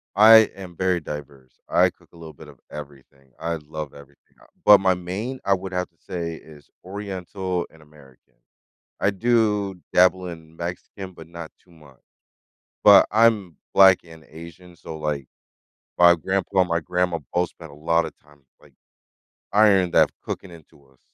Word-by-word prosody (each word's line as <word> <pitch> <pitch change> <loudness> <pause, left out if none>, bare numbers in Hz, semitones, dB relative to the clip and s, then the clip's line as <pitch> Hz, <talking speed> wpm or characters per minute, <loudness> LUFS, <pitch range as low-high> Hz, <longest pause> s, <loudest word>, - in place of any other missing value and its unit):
I 110 +2 +8
am 95 -3 -10
very 90 0 0
diverse, 70 -4 -10
I - - +4
cook - - -24
a - - -18
little 80 -2 -11
bit 75 +1 -14
of 70 -4 -17
everything. 70 -2 -12
I 85 0 -2
love 75 -2 -8
everything 70 0 -16 0.2
I - - -19 0.2
but 105 -1 +9
my 95 -1 +3
main, 95 +9 -5
I 100 - +3
would 95 0 -4
have 90 0 -2
to 85 - -42
say, 85 -1 -5
is 75 -3 -16
Oriental 95 -2 -5
and 80 - -20
American. 75 -4 -21 0.7
I 100 - +2
do 105 -2 +1 0.2
dabble 90 0 +3
in 80 -2 -11
Mexican, 90 +3 -7
but 80 -2 -13
not 85 -1 -9
too - - -29
much. 75 -6 -19 0.9
But - - +8
I'm 105 -7 +2 0.2
Black 95 -2 +7
and 80 -2 -15
Asian, 85 +2 -13
so, 80 - -9
like, 75 -3 -3 0.7
my 85 0 +7
grandpa 95 +3 -2
and 90 - -1
my 85 0 +1
grandma 90 +1 -1
both 90 0 0
spent 80 -3 -14
a - - -14
lot 85 +3 +1
of - - -9
time 75 0 -24
just, 65 - -42
like, - - -21 0.8
ironed 100 -4 +4
that - - +4
cooking 95 - -6
into 80 -4 -17
us. 65 -1 -29
85 Hz, 175 wpm, -23 LUFS, 75-95 Hz, 0.9 s, but